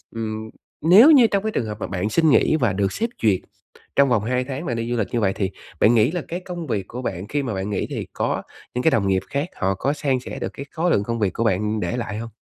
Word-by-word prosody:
ừm, 110 -1 -4 0.3
nếu 195 - +8
như 260 -6 +7
trong 200 -2 0
cái 220 - -1
trường 120 - -1
hợp 105 -1 -5
mà - - -3
bạn 90 +2 -2
xin 160 +7 +3
nghỉ 150 - +4
và 120 -10 +1
được 100 0 0
sếp 230 +2 -1
duyệt, 100 -5 +4 0.6
trong 140 -1 +5
vòng 115 -4 +2
2 125 +3 0
tháng 135 +5 -5
bạn 120 - -2
đi 115 0 -3
du 120 - 0
lịch 105 - 0
như 120 - +2
vậy, 95 -3 +1
thì 95 -1 -2 0.3
bạn 110 - +5
nghĩ 115 +4 +4
là 175 0 -2
cái 175 - -4
công 175 -3 -7
việc 100 -7 -2
của 125 - -6
bạn 95 -5 -4
khi 145 +4 -1
mà 120 -5 -3
bạn 95 +1 -3
nghỉ, 100 - -2
thì - - -4
có - - -1 0.3
những 125 - -1
cái 160 - +4
đồng 100 -3 +2
nghiệp 95 -1 +1
khác 140 +5 -2
họ 95 0 0
có 135 +10 0
san 140 -3 0
sẻ 125 - -7
được - - -4
cái 140 - -7
khối 170 +1 0
lượng 100 - +2
công 115 +2 -3
việc 100 -4 0
của 115 - -1
bạn 105 0 0
để 120 - -2
lại 115 -3 -4
hông? 115 +1 -5
115 Hz, 290 wpm, -22 LUFS, 105-145 Hz, 0.6 s, nếu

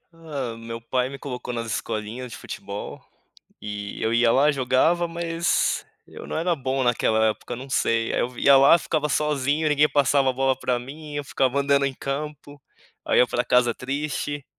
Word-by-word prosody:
Ah, 140 -8 -5
meu 115 0 -7
pai 125 +2 -1
me 140 - -8
colocou 125 -3 -6
nas 115 -1 -3
escolinhas 110 +3 -4
de - - -7
futebol, 100 +1 -7 0.6
e 105 -1 -6
eu 110 - 0
ia 115 0 +4
lá, 140 +5 +4
jogava, 145 +6 +2
mas 170 0 0 0.2
eu - - -10
não - - -3
era 170 +2 +1
bom 135 -1 -1
naquela 110 -2 +2
época, 120 +2 -5
não 130 +3 -8
sei. 115 -3 +1
Aí - - 0
eu 120 - 0
vi 125 - -7
ia 140 - +7
lá, 140 +5 +7
ficava 155 -3 -1
sozinho 150 +1 0
e - - +3
ninguém 150 0 +4
passava 140 -1 +3
a - - 0
bola 135 +1 +1
pra 125 -2 0
mim. 145 +4 -9
Eu 145 - -2
ficava 135 -1 0
andando 140 0 +2
em 135 -1 -3
campo, 145 +1 -6 0.4
aí - - +2
ia 125 - +5
pra 120 - 0
casa 125 -1 +3
triste. 145 +2 -4
135 Hz, 195 wpm, -24 LUFS, 120-145 Hz, 0.6 s, ia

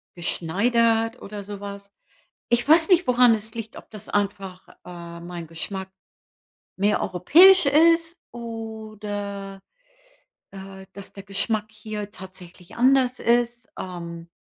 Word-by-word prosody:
geschneidert 225 +7 +1
oder 205 0 -8
sowas. 200 0 -9 0.6
Ich 240 +3 +1
weiß 320 +3 +5
nicht, 360 -1 +4
woran 245 -2 +5
es 215 +1 -8
liegt, 225 -1 -7
ob - - -13
das 215 -1 -11
einfach 195 -2 -3 0.2
äh, 170 -1 -9
mein 170 -1 -8
Geschmack 190 +4 -6 0.9
mehr 205 +2 +2
europäisch 340 - +6
ist 330 +3 +3
oder, 215 -4 -7 0.9
äh, 190 0 -10
dass 200 -1 -10
der 195 - -10
Geschmack 205 +2 -1
hier 210 -1 -7
tatsächlich 185 -1 -13
anders 255 0 +3
ist. 240 0 0
Ähm, 170 -2 -7
205 Hz, 115 wpm, -24 LUFS, 190-235 Hz, 0.9 s, europäisch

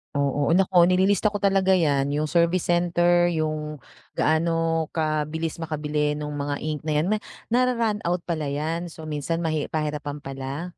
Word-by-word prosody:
Oo, 140 +2 +1
naku 180 -1 +5
nililista 195 +3 +3
ko 205 - -3
talaga 195 -1 +3
yan, 145 -6 +2
yung 150 +1 0
service 170 +2 +2
center, 175 0 +3
yung 155 -2 -2 0.3
gaano 165 0 +1
kabilis 155 0 -1
makabili 150 -2 -2
nung 150 0 -4
mga 145 0 -3
ink 155 -1 -3
na 155 - -2
yan. 160 - +1 0.4
Na-ra-run 235 -3 +1
out 175 +1 0
pala 155 -4 -2
yan, 165 +4 -3
so 160 -1 -10
minsan 155 +2 -2
mahi 155 -3 -2
pahirapan 150 -1 -3
pala? 135 +4 -5
160 Hz, 150 wpm, -24 LUFS, 150-175 Hz, 0.4 s, naku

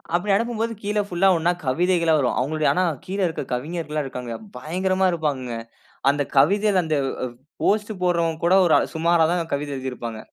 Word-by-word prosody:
அப்டி 190 +4 0
அனுப்பும்போது 230 +1 -1
கீழ 210 +1 0
புல்லா 180 +2 +2
ஒன்னா 165 +2 +2
கவிதைகள்லாம் 170 +3 +2
வரும். 130 -3 0
அவங்களுடைய 155 +4 +1
ஆனா 185 - +1 0.2
கீழ 195 +2 -4
இருக்க 160 - -4
கவிஞர்கள்லாம் 150 +2 -3
இருக்காங்க. 125 -2 -6 0.3
பயங்கரமா 185 +4 0
இருப்பாங்கங்க. 140 -8 -2 0.5
அந்த 145 +1 -2 0.2
கவிதையில 200 +5 +4
அந்த 155 -1 -1 0.3
அ - - -2 0.4
போஸ்ட் 210 +1 +1
போடுறவங்க 170 -2 +1
கூட 175 - +4
ஒரு 170 - +3
அ - - +1
சுமாரா 165 0 +3
தான் 170 -2 -2
கவிதை 145 0 -4
எழுதியிருப்பாங்க. 125 -4 -5
165 Hz, 165 wpm, -23 LUFS, 145-185 Hz, 0.5 s, கவிதையில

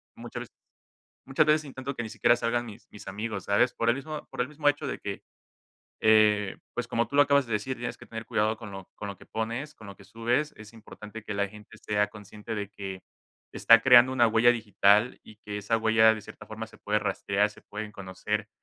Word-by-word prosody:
muchas - - -7
veces - - -18 0.7
muchas 135 +3 +2
veces, 155 0 +3
intento 135 0 -6
que 120 - -3
ni 110 - -6
siquiera 120 - +3
salgan 120 0 -1
mis, 110 -3 -12
mis 105 - -12
amigos, 105 0 -4
¿sabes? 105 +5 +3
Por 115 - -2
el 120 - +3
mismo 150 +3 -7
por - - -3
el 125 - -2
mismo 150 0 -3
hecho 145 +1 -2
de - - -4
que, 100 -1 -6 0.9
eh, 105 -2 +4 0.2
pues - - -3
como 115 -1 0
tú 140 - -4
lo 145 - +8
acabas 140 -1 +3
de 115 - -6
decir, 130 +5 -2
tienes 120 0 -4
que - - -13
tener 115 0 -7
cuidado 110 +1 +1
con 110 -2 -9
lo 95 -1 -10
con 105 - -6
lo 100 - -6
que - - -16
pones, 115 +7 -4
con 110 - -13
lo 100 - -10
que 100 - -16
subes. 120 +9 -1
Es 105 0 -12
importante 110 0 -11
que 105 - -5
la 100 0 0
gente 105 +1 -14
sea 105 -1 0
consciente 105 +1 -9
de 100 -1 -4
que, 95 -2 -7 0.5
está 115 0 +6
creando 125 0 +7
una 120 -2 +4
huella 115 +2 +5
digital, 105 0 +3
y 110 - -15
que 105 -1 -7
esa 110 +3 0
huella 110 0 +5
de 110 - -7
cierta 105 - -12
forma 110 +1 -6
se 110 - -17
puede 105 +1 0
rastrear, 100 0 0
se - - -17
pueden 105 0 -7
conocer, 100 +2 -4
110 Hz, 230 wpm, -28 LUFS, 105-120 Hz, 0.9 s, lo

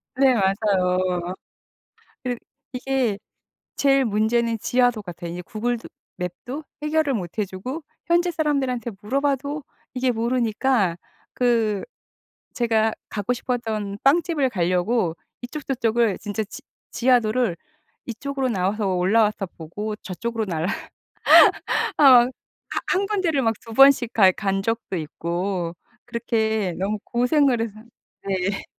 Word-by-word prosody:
네. 265 -1 +5
맞아요. 185 -3 +1 0.9
그러 250 -1 -1 0.4
이게 250 -5 0 0.6
제일 275 -1 +4
문제는 225 +2 +1
지하도 245 -3 +2
같아요. 175 -2 -7
이제 180 +1 -6
구글도 230 +5 -3 0.3
맵도 245 - -6 0.2
해결을 300 -2 +1
못 180 -3 -5
해 210 - +2
주고 225 - -6 0.2
현지 345 +1 +3
사람들한테 270 -8 -1
물어봐도 280 +4 -1 0.3
이게 255 0 +1
모르니까 230 -4 +1 0.4
그 230 -4 +1 0.7
제가 225 -2 +2 0.2
가고 210 +3 -1
싶었던 220 -5 -3
빵집을 295 -2 +3
가려고 180 -1 +1 0.3
이쪽저쪽을 240 -6 0
진짜 205 +1 -3
지 - - -11 0.3
지하도를 240 -5 +2 0.5
이쪽으로 265 +3 -3
나와서 195 -1 0
올라와서 210 +2 +2
보고 205 +7 -5
저쪽으로 225 +5 -4
날 160 -3 -2 1.3
아 - - +4
막 250 -4 +8 0.4
하 - - -1
한 390 +2 +1
군데를 370 -9 0
막 225 -1 +2
2 230 - -11
번씩 265 -2 +6
가 195 -4 +6
간 195 -1 -1
적도 225 -3 -2
있고 170 +2 -3 0.3
그렇게 220 -5 -1
너무 205 +3 -1
고생을 250 0 +2
해서 215 -1 -5 0.5
네. 195 +1 -1
225 Hz, 250 characters per minute, -23 LUFS, 195-255 Hz, 1.3 s, 막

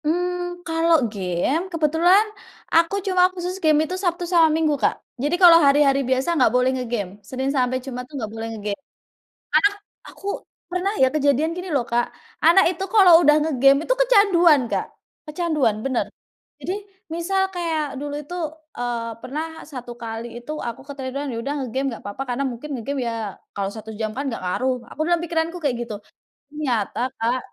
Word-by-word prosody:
Mmm, 355 +2 -2
kalau 330 0 +3 0.2
game 190 - -1
kebetulan 335 +5 +4 0.5
aku 335 +4 +4
cuma 370 -2 +3
khusus 360 0 -4
game 310 0 +4
itu 315 - -5
Sabtu 350 -1 0
sama 335 -2 +4
Minggu, 310 -1 +2
Kak. - - +3 0.3
Jadi, 295 +5 +1
kalau 350 -2 +9
hari-hari 275 -1 +4
biasa 260 +6 +1
nggak 255 - +5
boleh 250 +1 +3
nge-game. 240 -6 -2 0.2
Senin 265 +1 -2
sampai 255 -2 +1
Jumat, 250 -2 -5
tuh, 300 - -11
nggak 220 -5 -4
boleh 225 0 -5
nge-game, 205 +4 -4 0.7
karena 405 - +5 0.4
aku - - -14 0.5
pernah 365 +3 -1
ya, 260 - +7
kejadian, 295 +1 +2
gini 360 +2 -6
loh, 260 - +2
Kak. 240 +1 0 0.4
Anak 345 +4 +7
itu 370 +1 -5
kalau 385 -5 +7
udah 300 -2 +6
nge-game 275 -1 +4
itu - - +2
kecanduan, 390 - +5
Kak, - - 0 0.4
kecanduan, 305 -7 0
bener. 260 -3 0 0.6
Jadi, 365 - -2 0.4
misal 385 +3 0
kayak 330 -3 -1 0.2
dulu 290 0 -4
itu, 350 +5 -8 0.4
eee, 235 -1 -2
pernah 300 +5 -4 0.3
satu 250 -3 -7
kali 225 0 -5
itu 240 +5 -8 0.2
aku 235 - -6
ketiduran, 275 0 -5
ya - - -4
udah, 280 - -2
nge 265 - -3
game 270 +1 0
nggak 230 - -9
papa 205 +7 -4
karena 245 +3 -1
mungkin 245 +6 -8
nge-game 275 +4 -3
ya, - - -1 0.4
kalau 200 -1 -1
1 220 0 -8
jam 215 -1 -1
kan 275 - -2
nggak 230 - -4
ngaruh, 255 +8 0 0.2
aku 305 - -5
dalam 345 -1 +3
pikiranku 335 0 -1
kayak 275 -4 +1
gitu. 215 - -5 0.6
Ternyata, 250 -5 -1
Kak, 235 +3 +1
290 Hz, 175 wpm, -22 LUFS, 250-340 Hz, 0.7 s, kalau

